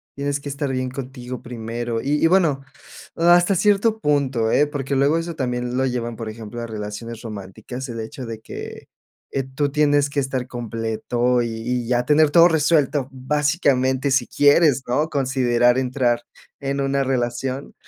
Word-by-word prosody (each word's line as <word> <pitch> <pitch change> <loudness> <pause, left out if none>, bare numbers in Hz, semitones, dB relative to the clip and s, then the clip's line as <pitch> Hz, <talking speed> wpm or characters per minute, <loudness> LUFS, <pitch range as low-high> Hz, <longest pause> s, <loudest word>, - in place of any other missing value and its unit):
tienes 140 0 -2
que 145 - -6
estar 140 0 -3
bien 130 -1 -2
contigo 125 -1 -7
primero. 115 0 -4
Y 145 +2 0
y, - - +7
bueno, 165 -6 +3 0.5
hasta 175 +3 +4
cierto 210 +3 +2
punto, 135 - +1
¿eh?, 150 - +4
porque 140 -1 -3
luego 140 +4 +3
eso 165 0 -4
también 125 -3 -2
lo 130 +1 +1
llevan, 120 -2 -3
por 115 -1 -5
ejemplo, 110 +1 -7
a 115 - -5
relaciones 110 +1 -6
románticas, 110 +5 -7
el 115 -1 -5
hecho 120 +4 -7
de 115 -1 -7
que, 110 - -8 0.5
eh, 135 - -1
tú 140 +2 -2
tienes 145 -1 +3
que 140 - -1
estar 130 -2 -2
completo 120 +1 -1
y 115 - -2
y 115 +2 -3
ya 120 0 +1
tener 150 +3 +4
todo 170 +2 +7
resuelto, 150 -4 +2
básicamente, 135 -1 +1
si 135 - +3
quieres, 145 -1 +4
¿no?, 150 +6 +1
considerar 125 -3 +2
entrar 125 -2 0 0.4
en 140 0 -2
una 135 0 +1
relación, 130 +1 -2
130 Hz, 165 wpm, -22 LUFS, 120-145 Hz, 0.5 s, y